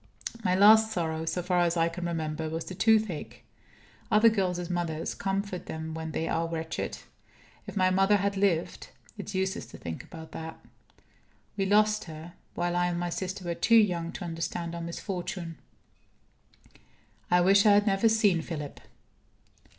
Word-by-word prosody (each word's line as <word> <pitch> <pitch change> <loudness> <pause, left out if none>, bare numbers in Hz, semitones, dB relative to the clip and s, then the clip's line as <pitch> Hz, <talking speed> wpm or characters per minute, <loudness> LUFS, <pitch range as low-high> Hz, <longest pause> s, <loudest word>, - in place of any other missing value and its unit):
My 185 -2 +2
last 220 +3 +7
sorrow, 160 -5 -2
so 170 +2 -2
far 180 0 +1
as 175 0 +2
I 165 0 +3
can 175 +1 -4
remember, 160 -1 -3
was 165 +1 -4
the - - -7
toothache. 215 -4 +1 0.7
Other 220 0 +6
girls' 180 -5 -1
mothers 170 -3 -2
comfort 195 -1 -3
them 160 0 -5
when 160 0 -5
they 160 +1 -2
are 165 0 0
wretched. 160 -1 -4 0.7
If - - -7
my 185 -1 +3
mother 195 +2 +4
had 200 +1 -1
lived 195 -4 0 0.3
it's - - -6
useless 190 0 -1
to - - -11
think 80 -2 -6
about 160 -1 -11
that. 160 0 -7 1.0
We 195 -1 0
lost 215 +1 +3
her, 160 +1 -9 0.2
while 175 0 -1
I 175 0 +2
and 175 -1 -2
my 175 0 -2
sister 185 +1 -4
were 170 - -1
too 230 +6 +3
young 175 -6 +3
to - - -6
understand 165 0 -4
our 170 - -5
misfortune. 170 -1 -5 1.7
I 180 0 +4
wish 200 +3 +5
I 205 - +7
had 205 0 +4
never 200 +2 +3
seen 205 -6 +3
Philip. 150 -4 -6
175 Hz, 165 wpm, -28 LUFS, 165-200 Hz, 1.7 s, last